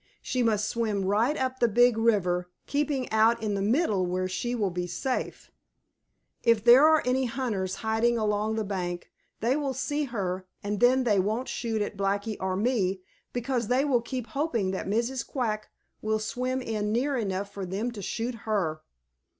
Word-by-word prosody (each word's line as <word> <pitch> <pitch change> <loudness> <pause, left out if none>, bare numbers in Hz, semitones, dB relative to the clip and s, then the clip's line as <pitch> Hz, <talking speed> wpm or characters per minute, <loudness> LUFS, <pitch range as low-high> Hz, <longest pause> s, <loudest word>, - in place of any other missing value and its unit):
She 255 - -1
must 215 -3 +2
swim 215 -4 -1
right 225 +9 +2
up 260 0 -2
the 235 - +4
Big 240 +2 +4
River, 180 -6 +1 0.2
keeping 285 -3 -1
out 225 +1 +3
in 210 -1 0
the 200 - -1
middle 215 - +2
where 185 +1 -1
she 240 +6 -2
will 205 -5 0
be 180 0 -3
safe. 255 +8 -3 0.9
If 230 -3 +3
there 250 +5 +8
are 315 -1 +4
any 255 +1 +2
hunters 220 -7 -2
hiding 225 +2 +2
along 215 0 0
the 220 - -1
bank, 180 -3 -4 0.3
they 240 +4 +2
will 280 -3 -1
see 290 +3 -1
her, 190 -6 -3 0.2
and 205 0 -2
then 255 +3 +5
they 210 -5 +3
won't 220 +7 0
shoot 225 -4 -1
at 205 - -6
Blacky 200 +2 -1
or 190 0 -1
me 195 -3 0 0.3
because 245 -1 -1
they 255 +4 +2
will 255 -5 +2
keep 250 0 -4
hoping 235 -6 -1
that 190 - -4
Mrs. 235 +5 0
Quack 220 -5 -3 0.3
will 215 0 +1
swim 255 +4 -2
in 210 -2 -2
near 265 +5 +1
enough 200 -3 -2
for 200 - -5
them 200 +7 -2
to 215 -4 -8
shoot 230 +6 -3 0.2
her. 160 -7 0
220 Hz, 180 wpm, -27 LUFS, 200-250 Hz, 0.9 s, there